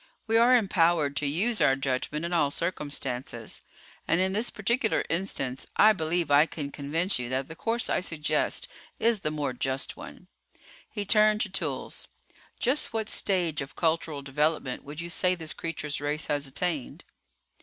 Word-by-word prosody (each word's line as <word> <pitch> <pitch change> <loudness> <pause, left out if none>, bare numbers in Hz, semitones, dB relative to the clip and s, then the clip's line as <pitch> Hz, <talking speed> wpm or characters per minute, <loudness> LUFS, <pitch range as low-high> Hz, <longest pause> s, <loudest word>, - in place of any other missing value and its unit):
We 225 - 0
are 240 +2 +7
empowered 170 -8 +2
to 145 - 0
use 210 +11 0
our 135 - +5
judgment 135 +4 -2
in 175 - -3
all 150 -4 +3
circumstances. 140 - -3 0.5
And 165 - +3
in 190 +1 +1
this 220 +4 +1
particular 230 +1 0
instance 150 -7 -2
I 215 +1 +7
believe 165 -3 0
I 145 +3 +6
can 145 -4 -5
convince 155 +5 -1
you 120 -1 -4
that 130 +1 -1
the 160 - -9
course 230 +6 -1
I - - +1
suggest 160 -4 0 0.3
is 230 -2 +2
the 150 - -2
more 150 -4 -2
just 135 +2 -2
one." 180 - -11 0.6
He 205 -2 -4
turned 215 +1 +4
to 210 - -1
Toolls. 195 - -4 0.5
"Just 255 0 +1
what 220 -1 -2
stage 175 -6 0
of 140 +2 -8
cultural 160 -3 0
development 150 -1 -1
would 145 +3 -7
you 170 - -5
say 180 +2 +3
this 160 -3 -3
creature's 150 -3 -3
race 150 +1 -1
has 145 -1 -1
attained?" 150 0 -2
160 Hz, 165 wpm, -28 LUFS, 145-195 Hz, 0.6 s, are